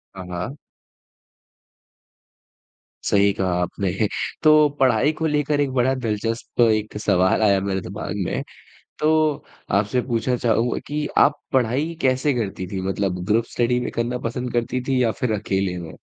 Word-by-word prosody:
हाँ, 95 -1 -7
हाँ। 90 - -5 2.5
सही 100 0 +3
कहा 95 -1 -1
आपने 90 +2 -2 0.5
तो, 155 -1 +6
पढ़ाई 130 +2 +4
को 160 - -3
लेकर 150 -1 +1
एक 140 -2 0
बड़ा 130 +1 +2
दिलचस्प 115 -1 -2
एक 110 -2 +2
सवाल 95 0 +2
आया 100 -2 +4
मेरे 95 -1 -1
दिमाग़ 100 +4 -6
में। - - -2 0.6
तो 155 +1 +3 0.7
आपसे 105 +5 0
पूछना 120 0 0
चाहूँगा 120 0 +1
कि 150 0 -2
आप 145 +1 +4
पढ़ाई 130 +6 +1
कैसे 130 +2 +2
करती 100 -5 -3
थीं? 95 0 -4
मतलब 95 -2 -1
ग्रुप 110 +3 +2
स्टडी 125 0 +1
में 125 - -3
करना 120 +1 -2
पसंद 125 +1 -4
करती 120 +1 -1
थीं 135 -1 +1
या 115 -3 +3
फिर 125 - +1
अकेले 95 -3 -1
में? 85 -2 -8
115 Hz, 150 wpm, -22 LUFS, 100-130 Hz, 2.5 s, तो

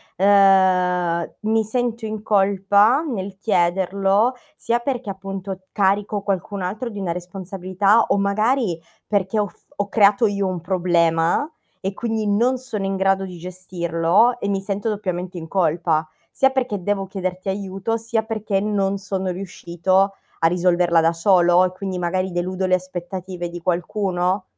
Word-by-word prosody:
ehm, 185 -3 +3
mi 220 +1 +1
sento 235 0 -2
in 215 -1 -4
colpa 205 +5 +3
nel 200 - -5
chiederlo, 195 +4 +2 0.2
sia 235 +1 0
perché 245 -3 -3
appunto 195 0 -6
carico 200 +1 +1
qualcun 195 0 -3
altro 215 +7 -3
di 205 -2 -7
una 180 -3 -2
responsabilità, 190 +3 0
o - - +3
magari 205 -1 +1 0.3
perché 205 +1 0
ho 205 - +1
f - - -21
ho 205 0 -1
creato 210 +1 +4
io 200 -1 -1
un 185 -2 -3
problema, 175 - +1 0.3
e 195 +1 -3
quindi 220 -1 -2
non 240 +6 +2
sono 225 -6 -5
in 195 0 -1
grado 195 0 +1
di 180 -2 -9
gestirlo 180 +4 +1
e 200 - -3
mi 195 -1 0
sento 200 +2 -2
doppiamente 185 -3 -3
in 160 -1 -7
colpa, 165 -3 +1 0.2
sia 270 - +3
perché 250 -7 -2
devo 195 +1 -1
chiederti 185 0 -4
aiuto, 195 +3 -2
sia 225 0 -1
perché 215 -3 -2
non 200 -1 0
sono 190 -1 -3
riuscito 185 +1 0 0.3
a 165 - +4
risolverla 175 -1 +3
da 165 +1 +2
solo, 175 0 +4
e 180 - -2
quindi 185 -1 -5
magari 185 +2 -1
deludo 185 +2 -2
le 185 0 +3
aspettative 180 0 -5
di 175 0 -7
qualcuno? 185 +1 -1
195 Hz, 150 wpm, -21 LUFS, 180-205 Hz, 0.3 s, creato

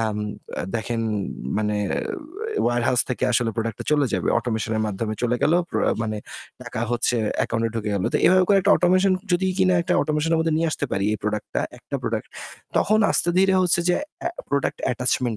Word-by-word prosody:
আম 110 -2 -1 0.4
আ - - -2
দেখেন 115 +1 -2 0.6
মানে 105 0 0 0.9
warehouse 120 +1 +2
থেকে 125 - -1
আসলে 115 0 +2
product-টা 115 -1 -3
চলে 145 -2 +3
যাবে। - - -1
Automation 110 -2 -2
এর 110 - 0
মাধ্যমে 110 +1 -3
চলে 120 0 +1
গেল। 155 - +3 0.2
প্র - - -1 0.2
মানে 110 -1 -2 0.5
টাকা - - -5
হচ্ছে 120 0 +1 0.3
account 115 0 -1
এ - - 0
ঢুকে 110 -2 -2
গেল। 95 -2 -1
তো - - +6
এভাবে 185 0 +6
করে 200 -1 +5
একটা 200 +1 +4
automation 185 +2 +3 0.2
যদি 185 +2 +2
কিনা 185 -1 +4
একটা 180 +1 -1
automation 155 +1 0
এর - - +2
মধ্যে 160 -1 +1
নিয়ে 165 +1 +1
আসতে - - -2
পারি 95 - 0
এই 110 - -2
product-টা, 105 0 -2 0.2
একটা - - -5
product। - - -2 0.5
তখন 215 +2 +3
আস্তে - - +2
ধীরে 190 0 +4
হচ্ছে 175 -1 +3
যে 180 - +4 0.3
আ - - +3 0.2
product 140 -1 -1
attachment 125 -1 0
120 Hz, 190 wpm, -23 LUFS, 110-175 Hz, 0.9 s, তো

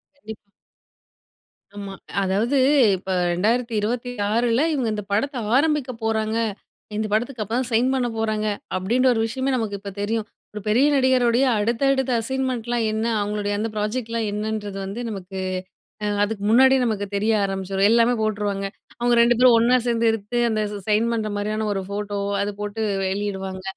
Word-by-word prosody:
கண்டிப்பா, 220 -6 -9 1.4
ஆமா, 200 -1 -6 0.3
அதாவது 215 +9 +1 0.4
இப்ப 190 +1 -4 0.2
2026ல 230 +3 0
இவுங்க 255 -6 0
இந்த 210 -1 -4
படத்த 265 +7 0 0.2
ஆரம்பிக்க 295 -2 +2
போறாங்க. 220 0 0 0.6
இந்த 215 - -1
படத்துக்கு 235 +2 -1
அப்பதான் 235 +4 -2
சைன் 235 +3 +3
பண்ண 255 -2 0
போறாங்க. 215 -1 -1 0.3
அப்டின்ற 235 +8 +1
ஒரு 225 - 0
விஷயமே 260 +4 -2
நமக்கு 220 -4 -2
இப்ப 200 0 -7
தெரியும். 220 +1 -1 0.3
ஒரு 210 - -6
பெரிய 240 +7 +4
நடிகருடைய 255 -1 +3
அடுத்த, 230 +3 -1
அடுத்த 265 -1 -1
அசைன்மெண்ட்லாம் 240 -2 -1
என்ன? 220 +1 -1 0.2
அவங்களுடைய 205 0 -2
அந்த 220 +2 -2
ப்ராஜெக்ட்லாம் 225 +1 -2
என்னன்றது 210 -1 -3
வந்து, 200 +5 -6
நமக்கு, 190 -2 -6 0.6
அ - - 0 0.2
அதுக்கு 205 -1 -3
முன்னாடியே 265 +3 +5
நமக்கு 210 -3 -1
தெரிய 210 +3 +1
ஆரம்பிச்சுரும். 195 0 0
எல்லாமே 235 +1 +4
போட்டுருவாங்க. 205 -2 -1 0.3
அவுங்க 240 0 +3
2 235 0 +4
பேரும் 250 -2 +7
ஒண்ணா 245 +2 +4
சேந்து 230 -1 +2
எடுத்து. 225 +2 -3
அந்த 215 -1 0 0.3
சைன் 220 +2 +3
பண்ற 215 -2 -2
மாரியான 215 +1 -2
ஒரு 195 -1 -3
ஃபோட்டோ, 205 0 -3 0.2
அது 205 +1 -2
போட்டு 210 +2 -3 0.2
வெளியிடுவாங்க. 190 -1 -3
220 Hz, 145 wpm, -23 LUFS, 205-240 Hz, 1.4 s, பேரும்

